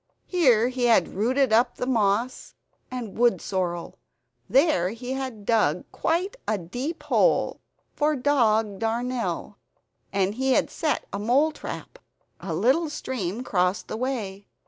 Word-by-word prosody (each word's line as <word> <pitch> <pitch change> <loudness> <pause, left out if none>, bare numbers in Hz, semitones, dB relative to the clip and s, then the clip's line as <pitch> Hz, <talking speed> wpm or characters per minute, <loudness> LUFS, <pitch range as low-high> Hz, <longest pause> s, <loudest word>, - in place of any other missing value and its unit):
Here 250 - +3
he 255 -1 -1
had 225 -7 +4
rooted 250 +5 +1
up 235 +3 +3
the - - -3
moss 230 0 0 0.3
and 245 -5 -6
wood 240 0 +3
sorrel. 175 -3 -3 0.5
There 265 - +3
he 245 +4 -6
had 260 -6 -5
dug 200 -8 +2
quite 365 +7 -1
a 215 - +1
deep 245 - -5
hole - - +2 0.3
for 300 +1 +1
dog 225 -7 +2
darnel; 235 +2 -2 0.5
and 195 0 +1
had 265 +2 +1
set 310 - -1
a 200 - -2
mole 260 +9 +3
trap. - - -8 0.4
A 170 -4 -4
little 265 - +2
stream 235 -6 -4
crossed 180 -4 0
the - - -3
way. 220 -6 -3
235 Hz, 135 wpm, -25 LUFS, 200-265 Hz, 0.5 s, had